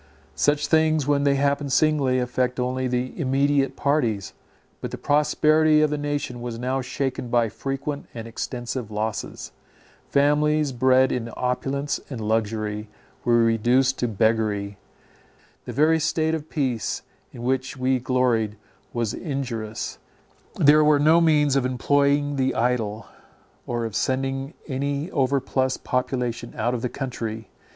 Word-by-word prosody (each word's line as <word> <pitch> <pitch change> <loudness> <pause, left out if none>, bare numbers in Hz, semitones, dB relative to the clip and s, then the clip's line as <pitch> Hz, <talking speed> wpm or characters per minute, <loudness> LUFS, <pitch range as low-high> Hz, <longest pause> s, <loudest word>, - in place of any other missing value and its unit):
Such 145 0 +1
things, 155 -1 +3
when 145 0 +2
they 140 -1 +4
happen 140 +1 0
singly, 140 -2 +2
affect 125 0 -1
only 130 +1 -1
the 125 0 -2
immediate 135 -1 +1
parties; 115 -9 0 0.5
but - - -4
the - - -6
prosperity 155 +1 +3
of 150 - +2
the 150 - -1
nation 145 -4 -3
was 120 -1 -5
now 130 +2 -1
shaken 130 0 -3
by 120 -1 +2
frequent 140 +5 -4
and 115 -1 -7
extensive 120 0 -4
losses. 110 +1 -4 0.6
Families, 150 +1 +2
bred 130 +1 +3
in 115 -2 -2
opulence 135 +3 -1
and 130 -5 -5
luxury, 110 -1 -2 0.3
were 120 -1 +4
reduced 120 +4 +2
to 120 - +1
beggary. 105 -2 0 0.9
The - - -5
very 155 +3 +3
state 160 +1 0
of 160 -1 -4
peace 130 -7 -2 0.3
in 120 - -9
which 130 +1 -1
we 130 0 +1
gloried 120 -4 +1 0.4
was 115 -3 -1
injurious; 120 - -4 0.6
there 150 +1 +6
were 150 -1 +5
no 155 +4 +5
means 150 -4 +3
of 135 - +2
employing 140 +3 +1
the 130 0 +1
idle, 115 -3 0 0.6
or 120 -1 -2
of 110 -2 -5
sending 135 +3 -1
any 140 +4 -2
overplus 130 -2 +1
of - - -15
population 125 -2 -2
out 120 +2 0
of 120 - -2
the 125 - -1
country. 115 -4 -5
130 Hz, 140 wpm, -24 LUFS, 120-145 Hz, 0.9 s, there